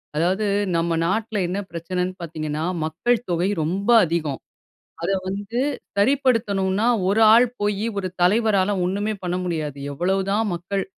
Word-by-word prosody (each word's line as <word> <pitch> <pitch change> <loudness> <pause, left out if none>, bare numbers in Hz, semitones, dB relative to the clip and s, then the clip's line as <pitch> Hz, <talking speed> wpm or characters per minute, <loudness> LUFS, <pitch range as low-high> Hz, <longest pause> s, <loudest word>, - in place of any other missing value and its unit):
அதாவது 185 +6 +1 0.3
நம்ம 165 0 +1
நாட்ல 220 +3 -1
என்ன 185 +3 -3
பிரச்சனன்னு 180 +2 -3
பார்த்தீங்கன்னா 155 -2 -4 0.2
மக்கள் 225 +10 +1
தொகை 175 +2 +1 0.2
ரொம்ப 195 +7 -2 0.2
அதிகம். 155 -4 -2 0.6
அத 185 - 0 0.2
வந்து 205 +5 -3 0.4
சரிப்படுத்தணுன்னா 215 -5 +2 0.2
ஒரு 220 +3 +2
ஆள் 240 +2 +7 0.2
போய் 205 0 0 0.2
ஒரு 185 - -2
தலைவரால 205 0 +3
ஒண்ணுமே 205 +4 -1
பண்ண 180 0 -1
முடியாது. 155 -5 -3
எவ்வளவுதான் 195 +7 0
மக்கள் 190 +3 -3
190 Hz, 125 wpm, -22 LUFS, 170-210 Hz, 0.6 s, ஆள்